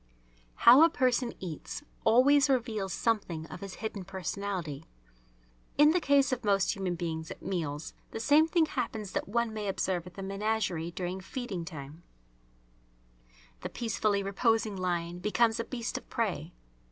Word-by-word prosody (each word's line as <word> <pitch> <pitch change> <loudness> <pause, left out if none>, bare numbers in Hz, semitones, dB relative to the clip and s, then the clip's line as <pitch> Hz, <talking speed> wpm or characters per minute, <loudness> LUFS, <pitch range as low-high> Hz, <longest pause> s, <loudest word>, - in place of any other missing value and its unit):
How 245 +5 +10
a 330 - +8
person 250 -3 +1
eats 175 - -6 0.2
always 275 +5 +5
reveals 225 -7 0
something 185 -8 -1
of - - -7
his 195 -2 -7
hidden 205 -3 -4
personality. 185 -5 -4 0.9
In 300 +1 +7
the 360 - +3
case 280 -2 +4
of 255 -1 -2
most 200 -2 +2
human 190 -3 -2
beings 160 -1 -4
at - - -9
meals 160 -5 -3 0.2
the - - -6
same 295 +7 +5
thing 325 -1 +3
happens 225 -8 -3
that - - -2
one 235 +1 0
may 210 -1 -4
observe 185 -2 -1
at 180 - -12
the 195 - -6
menagerie 195 -4 -1
during 180 +2 -4
feeding 190 -4 -5
time: 150 -1 -9 1.6
the - - -5
peacefully 215 -3 0
reposing 215 +1 +1
lion 175 -2 -2
becomes 225 +4 +2
a - - 0
beast 235 -2 -4
of - - -24
prey. - - -2
200 Hz, 155 wpm, -30 LUFS, 180-235 Hz, 1.6 s, How